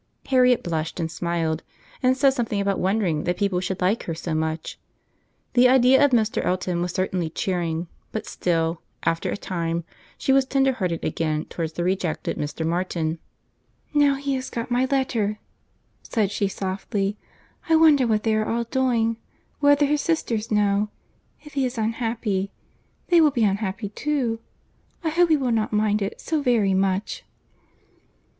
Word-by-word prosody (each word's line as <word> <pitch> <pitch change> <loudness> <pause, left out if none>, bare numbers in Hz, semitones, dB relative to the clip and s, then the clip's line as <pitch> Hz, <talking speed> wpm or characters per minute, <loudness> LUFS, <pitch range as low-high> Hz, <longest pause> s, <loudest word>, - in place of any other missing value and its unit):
Harriet 250 -2 +4
blushed 160 -1 -3
and 165 -1 -2
smiled, 165 -1 -1 0.4
and 255 0 +3
said 275 0 +5
something 230 -5 -1
about 200 -1 0
wondering 185 -5 +1
that 175 0 0
people 195 -2 +1
should 185 0 -3
like 190 +5 +1
her 165 - -3
so 165 0 -4
much. 160 0 -3 0.7
The 250 0 +6
idea 260 +2 +6
of 285 - +6
Mr. 225 -4 +1
Elton 180 -1 -1
was 175 0 -1
certainly 185 -2 -1
cheering; 170 -1 -2 0.2
but 220 - -4
still, 165 -1 -1 0.2
after 165 0 0
a - - -2
time, 170 -3 -2 0.3
she 270 - +1
was 270 0 +5
tender 270 0 +2
hearted 180 -8 -2
again 155 -2 -1
towards 160 -2 -4
the 175 - -2
rejected 180 -3 -1
Mr. 150 +2 -3
Martin. 165 -1 -1 0.7
"Now 290 -2 +4
he 280 0 -2
has 260 -1 -3
got 235 +1 -5
my 250 +2 +3
letter," 240 -6 0 0.6
said 210 -4 -1
she 205 -1 0
softly. 195 +1 -2 0.5
"I 325 - +6
wonder 305 -5 +5
what 215 -2 +1
they 220 - +2
are 215 0 +1
all 235 +1 0
doing—whether 255 +4 +1
his 295 +1 +1
sisters 230 -10 -1
know—if 210 +7 -2
he 275 -1 0
is 250 -2 -2
unhappy, 220 -3 -1 0.6
they 345 -2 +6
will 310 - +6
be 250 -5 0
unhappy 205 0 -1
too. 245 -1 -1 0.6
I 325 - +1
hope 345 +2 +3
he 315 - +5
will 260 -3 0
not 220 -2 0
mind 210 0 +1
it 195 - -3
so 315 -2 -1
very 230 -7 +2
much." 190 +1 0
210 Hz, 160 wpm, -24 LUFS, 180-255 Hz, 0.7 s, The